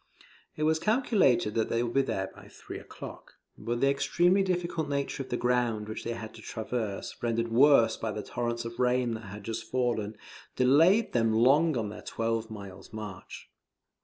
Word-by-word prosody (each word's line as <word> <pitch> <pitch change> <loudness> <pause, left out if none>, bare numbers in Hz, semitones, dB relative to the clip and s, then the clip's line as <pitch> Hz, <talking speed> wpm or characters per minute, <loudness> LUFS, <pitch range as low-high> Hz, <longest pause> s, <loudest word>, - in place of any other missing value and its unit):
It 155 - -2
was 160 +1 +3
calculated 200 - +2
that 110 -1 0
they 115 +1 +1
would 120 -1 -3
be 135 - +4
there 95 -8 -2
by - - -14
three - - -9
o'clock; - - -10 0.2
but 120 +1 -3
the 135 - +4
extremely 175 +7 +3
difficult 175 -5 -1
nature 140 -1 -2
of 130 - -7
the 120 - -1
ground 120 -4 0
which 110 - -6
they 120 - -2
had 110 -1 -7
to 110 - -12
traverse, 110 -2 -4
rendered 115 0 0
worse 115 -2 +5
by 110 - -3
the 105 0 -5
torrents 120 -1 -3
of 115 +1 -7
rain 125 -1 +2
that 110 -1 -6
had 100 +1 -9
just 115 +2 -5
fallen, 115 -4 -1 0.4
delayed 165 - +4
them 115 -2 +2
long 140 +6 +4
on 110 -3 -2
their 105 - -8
twelve 115 0 -2
miles' 100 -3 -10
march. 105 -3 -8
120 Hz, 185 wpm, -29 LUFS, 110-140 Hz, 0.4 s, worse